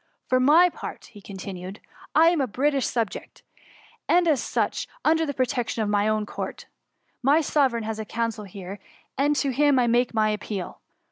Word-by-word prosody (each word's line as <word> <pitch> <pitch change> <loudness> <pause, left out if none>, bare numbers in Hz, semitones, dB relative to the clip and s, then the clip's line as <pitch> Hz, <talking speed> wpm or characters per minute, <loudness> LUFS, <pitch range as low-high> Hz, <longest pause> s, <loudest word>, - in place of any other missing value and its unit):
— - - -44
" - - -48
For 255 - +3
my 305 +7 +6
part," 315 - -9
continued 190 0 -7
he, - - -30 0.3
I 325 +2 +7
am 340 -4 +1
a 265 - 0
British 275 +3 0
subject, 230 -4 -4 0.7
an^ 355 0 +4
as 305 -6 +2
such, - - -1 0.2
tinder 320 0 +3
the 285 - -2
protection 245 -3 -1
of 210 - -2
my 205 0 +2
own 215 -1 0
Court; - - -6 0.6
my 275 +4 +4
Soverdgn 270 -7 +1
has 220 0 -4
a 220 - -4
consul 230 -1 -3
here, 195 +1 -9 0.4
and 290 +2 +2
to 280 -1 0
him 285 +1 +3
I 250 - +3
make 240 +1 +2
my 215 -1 +3
appeal. 210 -3 -5
240 Hz, 190 wpm, -25 LUFS, 210-285 Hz, 0.7 s, I